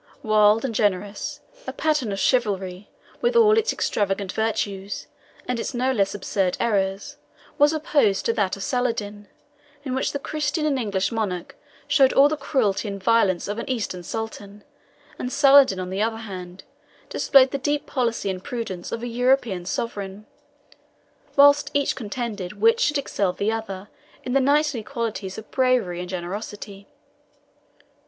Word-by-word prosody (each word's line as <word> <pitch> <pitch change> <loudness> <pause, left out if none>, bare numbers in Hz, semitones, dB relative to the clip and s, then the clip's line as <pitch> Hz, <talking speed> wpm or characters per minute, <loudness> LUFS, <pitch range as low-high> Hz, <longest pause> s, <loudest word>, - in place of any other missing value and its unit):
wild 215 +1 +4
and 245 - -2
generous, 205 -1 -1 0.3
a - - -2
pattern 300 -8 0
of 195 - -3
chivalry, 195 -6 0 0.3
with 480 0 +1
all 435 -2 +6
its 445 +1 +2
extravagant 195 -1 -1
virtues, 205 -3 -2 0.4
and 250 -1 -1
its 250 - -4
no 255 +2 +1
less 200 -6 0
absurd 190 -2 -1
errors, 205 +5 -1 0.4
was 290 +1 +6
opposed 290 -10 +1
to 230 - +2
that 200 -4 0
of 195 - -6
Saladin, 210 -4 -2 0.6
in 260 -3 -4
which 265 - 0
the - - -2
Christian 300 +2 -2
and 280 -3 +1
English 200 -4 -1
monarch 200 -6 -3 0.3
showed 275 -2 +4
all 275 +1 +7
the 310 - -1
cruelty 255 -8 0
and 200 -1 -6
violence 200 -5 +2
of 205 +2 -3
an - - -6
Eastern 210 -8 -2
sultan, 205 +1 -6 0.6
and 250 - -3
Saladin, 275 -7 +6
on 185 0 -4
the 195 +2 -2
other 225 +1 0
hand, 185 -4 -8 0.5
displayed 265 -2 +4
the 280 - -2
deep 290 +2 -1
policy 235 -6 -1
and 185 0 -7
prudence 210 -8 -5
of 230 - -4
a - - -2
European 240 -6 +1
sovereign, 200 -1 -4 1.1
whilst 285 +1 +6
each 285 -1 +1
contended 220 -5 -5
which 460 +1 +4
should 295 -9 +2
excel 200 -9 -1
the 205 +4 -1
other 210 -3 -5 0.4
in 250 - -3
the 275 - +4
knightly 285 -2 +2
qualities 220 -5 -4
of 220 - -10
bravery 250 -9 +1
and 180 0 -6
generosity. 200 +2 -6
225 Hz, 155 wpm, -23 LUFS, 195-265 Hz, 1.1 s, all